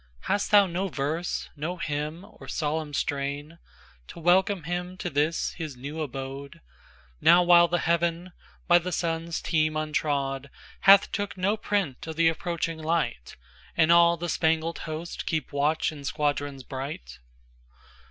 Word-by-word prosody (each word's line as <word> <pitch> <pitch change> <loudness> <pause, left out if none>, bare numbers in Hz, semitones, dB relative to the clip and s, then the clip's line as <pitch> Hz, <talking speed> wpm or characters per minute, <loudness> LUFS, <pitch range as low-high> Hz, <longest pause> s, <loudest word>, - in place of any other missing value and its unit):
Hast 200 0 -1
thou 205 -1 +7
no 185 +2 -2
verse, 160 +2 -3
no 160 +5 -4
hymn, 155 +3 -4
or - - -14
solemn 155 0 -2
strain, 145 +3 -3 0.5
To - - -10
welcome 180 +2 +3
him 180 +2 -4
to 180 - -4
this 150 +3 0
his 155 -6 -7
new 145 +5 -6
abode, 135 0 -6 0.6
Now 175 +1 +6
while 175 -1 +7
the 175 +1 0
heaven, 170 +1 0 0.4
by 175 -1 +6
the 180 +2 -5
Sun's 165 0 -2
team 155 -1 +1
untrod, 140 -3 -1 0.4
Hath 200 0 +8
took 205 -2 -3
no 195 +3 +1
print 200 -10 -2
of 160 - -5
the 165 0 +4
approaching 165 -1 -3
light, 155 - -2 0.4
And 160 - +4
all 170 0 +6
the 175 +1 -4
spangled 165 0 0
host 160 +2 -5
keep 155 -4 -2
watch 150 +3 +1
in 145 -2 -10
squadrons 145 -2 -2
bright? 130 - -7
160 Hz, 145 wpm, -27 LUFS, 145-175 Hz, 0.6 s, Hath